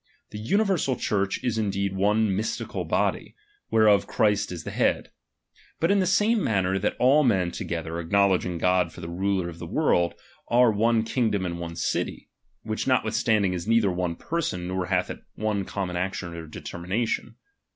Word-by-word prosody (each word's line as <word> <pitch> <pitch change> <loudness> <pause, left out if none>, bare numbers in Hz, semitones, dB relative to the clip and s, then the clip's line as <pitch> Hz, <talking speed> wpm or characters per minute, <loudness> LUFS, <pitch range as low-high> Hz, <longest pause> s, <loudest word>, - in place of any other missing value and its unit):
The 105 0 -7
tmiversal 190 - +1
Church 100 -2 0
is 115 -3 0
indeed 100 -2 -1
one 105 +1 +2
mi/stical 110 +3 -3
hody, - - 0 0.3
whereof 105 -2 +4
Christ 105 -2 +1
is 90 -2 -6
the - - -6
head; - - 0 0.7
but 165 - +2
in 200 - +4
the 185 - +1
same 210 +4 +3
manner 95 -2 +1
that 105 - -1
all 140 +4 +5
men 95 -9 +2
to - - -5
gether, 85 -1 -4
acknowledging 90 0 +2
God 90 +1 +2
for - - -12
the 85 - -6
ruler 95 +1 -1
of 85 -1 -8
the 85 - -6
world, 85 +1 +1 0.3
are 120 -1 +5
one 110 +2 +2
kingdom 110 -4 0
and 85 -1 -4
one 85 -1 -6
city; - - -3 0.3
which 110 +3 -3
not 130 -4 +3
withstanding 110 -3 +1
is 90 +1 -4
neither 115 -4 +3
one 90 -1 -2
person, 95 - -3
nor 90 0 -2
hath - - 0
it - - -8 0.2
one 105 -2 -1
common 95 -3 -4
action 90 -1 -3
or 85 -1 -7
determination. 90 +8 -3
100 Hz, 175 wpm, -26 LUFS, 90-110 Hz, 0.7 s, all